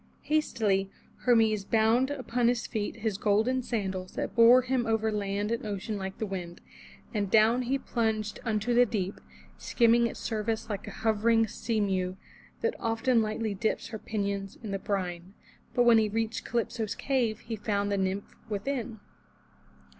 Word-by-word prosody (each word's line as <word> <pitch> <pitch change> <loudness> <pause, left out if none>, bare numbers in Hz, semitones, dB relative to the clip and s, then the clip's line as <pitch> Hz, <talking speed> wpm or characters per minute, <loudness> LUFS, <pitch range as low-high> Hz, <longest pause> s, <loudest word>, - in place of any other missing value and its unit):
Hastily 210 -11 +1 0.4
Hermes 220 -4 +4
bound 225 +5 +3
upon 250 -4 0
his 240 -1 +1
feet 210 -2 -3
his 220 -3 -2
golden 220 +5 +2
sandals 190 -6 -3
that - - -3
bore 240 +2 +7
him 255 -2 0
over 220 -1 +1
land 205 0 -2
and 235 - -1
ocean 210 0 -4
like 190 -1 -5
the 220 - -2
wind, 180 -4 -6 0.5
and 205 -2 -1
down 220 +4 +5
he 255 +2 0
plunged 220 -5 -2
unto 225 +1 0
the 245 +1 +5
deep, 200 -3 -3 0.4
skimming 235 0 +3
its - - -7
surface 220 0 -2
like 200 - -5
a - - -9
hovering 225 +1 +3
seamew 200 -4 -1 0.5
that 465 +1 +1
often 230 +1 +2
lightly 215 0 -2
dips 210 +4 -2
her 220 -1 -6
pinions 200 -2 -3
in 215 - -5
the 195 - -2
brine. 185 -1 -3 0.4
But 245 - +5
when 235 -2 +6
he 215 -1 +1
reached 225 +2 -2
Calypso's 230 -2 -2
cave 240 -6 0
he 230 -1 -5
found 205 -1 -1
the 200 - +1
nymph 190 +1 -2
within. 225 +1 -3
220 Hz, 160 wpm, -29 LUFS, 200-235 Hz, 0.5 s, bore